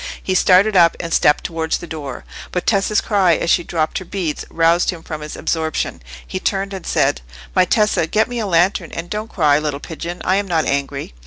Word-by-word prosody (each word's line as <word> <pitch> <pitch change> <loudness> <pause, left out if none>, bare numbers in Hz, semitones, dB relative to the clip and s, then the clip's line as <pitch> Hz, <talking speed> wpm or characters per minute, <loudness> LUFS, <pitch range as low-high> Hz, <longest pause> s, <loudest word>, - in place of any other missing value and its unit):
He 190 - -1
started 190 +3 +4
up, 170 -2 +5
and 165 -1 -4
stepped 150 - +3
towards 160 -1 -2
the - - -9
door; 150 -5 -7 0.3
but 180 - -2
Tessa's 205 0 +2
cry, 190 -6 +3
as 170 - 0
she 175 - +3
dropped 160 -2 -1
her - - -8
beads, 170 -4 -3
roused 165 +1 +2
him 170 -3 -4
from 155 -2 -6
his 150 0 -7
absorption. 160 - -2 0.2
He 185 - -4
turned 195 +1 -1
and 190 -2 -7
said— - - +1 0.3
"My 185 - +5
Tessa, 210 -5 +2
get 215 +5 +2
me 245 -1 -4
a 215 - -2
lantern; 175 0 +2
and 165 +1 -6
don't 215 +1 -4
cry, 150 -4 +3
little 150 -2 -3
pigeon, 170 +3 -7
I 190 - +3
am 200 0 -1
not 165 -3 +1
angry." 140 - -2
170 Hz, 215 wpm, -19 LUFS, 160-195 Hz, 0.3 s, up